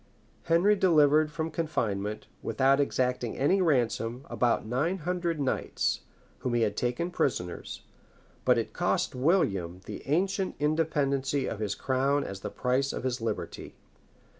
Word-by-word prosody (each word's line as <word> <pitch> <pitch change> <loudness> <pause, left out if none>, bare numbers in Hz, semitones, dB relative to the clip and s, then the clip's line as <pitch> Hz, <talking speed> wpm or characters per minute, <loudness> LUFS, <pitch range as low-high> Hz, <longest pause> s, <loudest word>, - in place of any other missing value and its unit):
Henry 175 +5 +4
delivered 155 -5 +4
from 160 0 -3
confinement, 105 -11 -2 0.2
without 135 +1 +2
exacting 125 -4 0
any 185 +8 +3
ransom, 125 -5 0
about 120 -3 +1
nine 140 - 0
hundred 175 -1 -2
knights, 135 -2 0 0.4
whom 125 -2 -1
he 120 - +3
had 105 -2 0
taken 125 +9 -1
prisoners; 90 - -2 0.6
but - - +4
it - - -2
cost - - 0
William 100 - +1
the 105 - -7
ancient 190 +5 0
independency 145 -3 +1
of 110 - -4
his 105 -2 -2
crown 135 +2 +1
as 95 - -6
the 105 - -5
price 130 +5 0
of - - -5
his 130 -2 -2
liberty. 110 -2 -4
135 Hz, 140 wpm, -29 LUFS, 120-160 Hz, 0.6 s, Henry